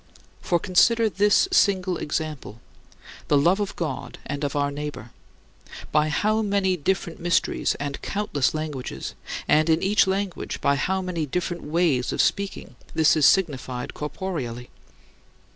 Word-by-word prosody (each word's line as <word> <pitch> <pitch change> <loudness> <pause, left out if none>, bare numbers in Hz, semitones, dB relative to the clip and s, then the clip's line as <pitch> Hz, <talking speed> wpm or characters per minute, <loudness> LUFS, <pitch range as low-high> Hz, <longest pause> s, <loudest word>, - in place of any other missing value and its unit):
For 175 - +1
consider 225 +6 +3
this 205 - +3
single 190 - +2
example 150 -8 -4 0.7
the 145 - +4
love 175 +8 +3
of 205 -1 -3
God 155 -6 -4
and 145 +1 -4
of 145 - -2
our 145 0 +1
neighbor 145 -5 -6 0.8
by 150 0 +3
how 215 +8 +1
many 200 -3 +1
different 175 +1 -2
mysteries 175 +1 +1
and 145 -1 -5
countless 200 -10 -1
languages, 150 -4 -5 0.3
and, 155 +1 +3
in 160 +2 +3
each 200 +1 +3
language, 190 -2 -2
by 140 - +2
how 190 +7 -1
many 170 -4 -3
different 175 +3 -3
ways 150 -5 +1
of - - -4
speaking, 200 -9 -1 0.2
this 160 -1 +4
is 155 -3 +5
signified 130 -9 0
corporeally! 150 -7 -5
165 Hz, 140 wpm, -24 LUFS, 145-190 Hz, 0.8 s, is